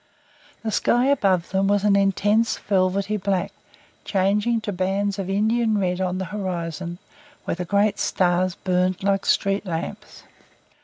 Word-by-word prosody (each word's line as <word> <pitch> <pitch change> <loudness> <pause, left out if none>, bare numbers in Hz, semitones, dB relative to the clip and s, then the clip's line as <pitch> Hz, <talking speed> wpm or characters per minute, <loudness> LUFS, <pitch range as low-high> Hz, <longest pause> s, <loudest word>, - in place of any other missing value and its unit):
The 220 - -2
sky 240 +3 +2
above 190 -10 +1
them 195 +1 +1
was 205 0 +2
an 205 -1 +4
intense 205 +3 +2
velvety 195 +1 0
black, 195 -2 -1 0.5
changing 205 +4 +1
to 205 - -3
bands 195 +2 -1
of 190 -1 -3
Indian 220 +2 +1
red 180 -2 -1
on 185 0 -1
the 190 - -3
horizon, 175 -3 -4 0.5
where - - -1
the 180 +1 -4
great 205 +3 +1
stars 180 0 +1
burned 185 +1 0
like 195 0 0
street 195 +1 +1
lamps. 165 -4 -6
195 Hz, 145 wpm, -23 LUFS, 185-205 Hz, 0.5 s, an